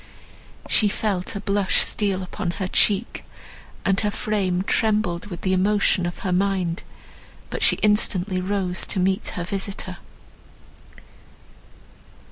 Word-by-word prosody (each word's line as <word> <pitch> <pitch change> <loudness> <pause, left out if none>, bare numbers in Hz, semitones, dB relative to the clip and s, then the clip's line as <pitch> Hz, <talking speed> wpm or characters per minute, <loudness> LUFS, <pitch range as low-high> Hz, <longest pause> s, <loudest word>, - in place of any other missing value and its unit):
She 215 - +4
felt 200 -3 -2
a - - -2
blush 200 -1 +1
steal 195 -3 +1
upon 185 +1 -4
her 190 - -2
cheek, 205 +3 +1 0.6
and 195 -1 +2
her 210 - +1
frame 200 -4 -1
trembled 205 -4 0
with 175 -4 -8
the 185 - 0
emotion 190 -1 +2
of 175 - -6
her 185 - 0
mind; 185 -2 0 0.7
but - - -4
she - - +6
instantly 200 -3 +3
rose 185 -1 -1
to 195 - -1
meet 190 +1 +1
her 175 - -2
visitor. 195 -1 -5
195 Hz, 125 wpm, -23 LUFS, 185-205 Hz, 0.7 s, she